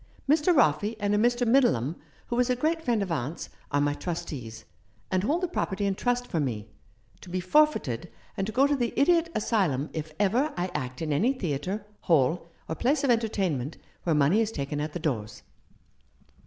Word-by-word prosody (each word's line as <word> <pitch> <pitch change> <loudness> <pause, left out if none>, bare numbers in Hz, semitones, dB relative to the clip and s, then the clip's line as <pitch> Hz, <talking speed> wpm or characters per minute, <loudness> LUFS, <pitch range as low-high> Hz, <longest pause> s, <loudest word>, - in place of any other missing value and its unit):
Mr. 300 +4 +4
Roffey 215 - +3
and 205 0 0
a - - +3
Mr. 240 +2 +2
Middleham, 200 - +3 0.3
who 240 - -3
was 250 +1 +2
a 250 - +3
great 320 +6 0
friend 235 -8 +1
of 185 - -5
aunt's, 150 +1 -3 0.2
are 145 - +1
my 145 0 +2
trustees, 145 -10 -6 0.5
and 185 -1 +2
hold 310 - +1
the 360 - +1
property 205 - -2
in 200 - +1
trust 245 +4 0
for 170 - -2
me, 115 -7 -2 0.5
to 185 - -11
be 185 +1 -2
for 300 +13 +5
feited 150 - -5 0.3
and 195 - -2
to - - -3
go 260 +5 +4
to 290 0 +2
the 240 -3 -1
Idiot 335 +3 +4
Asylum 180 - 0
if 155 -1 -4
ever 245 +9 +2
I 180 +1 -1
act 130 +4 -4
in 155 -2 -1
any 230 - +2
theatre, 190 - -3
hall, 165 +1 +2 0.2
or - - -2
place 270 - +1
of 270 - +4
entertainment 190 - 0 0.2
where 165 -3 +1
money 150 +9 +4
is 220 -1 0
taken 145 -3 -3
at 150 0 -4
the - - -2
doors." 110 -9 -3
190 Hz, 195 wpm, -27 LUFS, 150-245 Hz, 0.5 s, for